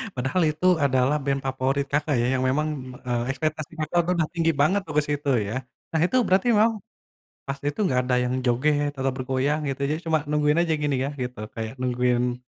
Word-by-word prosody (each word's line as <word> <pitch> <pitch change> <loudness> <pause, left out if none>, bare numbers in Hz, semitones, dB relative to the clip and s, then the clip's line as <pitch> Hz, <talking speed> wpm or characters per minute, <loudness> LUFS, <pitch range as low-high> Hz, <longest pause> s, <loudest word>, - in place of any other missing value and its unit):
Padahal 130 +8 0
itu 155 +4 -3
adalah 135 0 +2
band 135 0 -1
favorit, 135 +1 0
Kakak, 145 0 +1
ya, - - +1
yang - - 0
memang, 150 +3 +1 0.4
eee, 120 -1 0
ekspektasi 155 +3 -3
Kakak 155 +3 -1
udah 180 - +2
udah - - -2
tinggi 165 -1 +2
banget 190 +7 +3
tuh 155 - -6
ke - - +6
situ 145 0 -1 0.2
ya. 110 - -4 0.4
Nah, 160 - 0
itu 255 - -1
berarti 190 +5 +2
memang 225 +2 +4 0.8
pas 135 - -2
itu 145 - -5
enggak 130 -11 +2
ada 125 - +1
yang 125 +1 -1
joget 145 +4 +1
atau 135 0 0
bergoyang 135 +3 0
gitu? 135 0 -4
Jadi 155 +2 -1
cuma 160 -1 +3
nungguin 150 +2 +2
aja 165 -2 +1
gini 145 -2 +1
ya, 140 - -2
gitu, 125 -1 -5 0.2
kayak 110 -1 -4
nungguin 125 -1 +1
145 Hz, 200 wpm, -25 LUFS, 130-155 Hz, 0.8 s, ke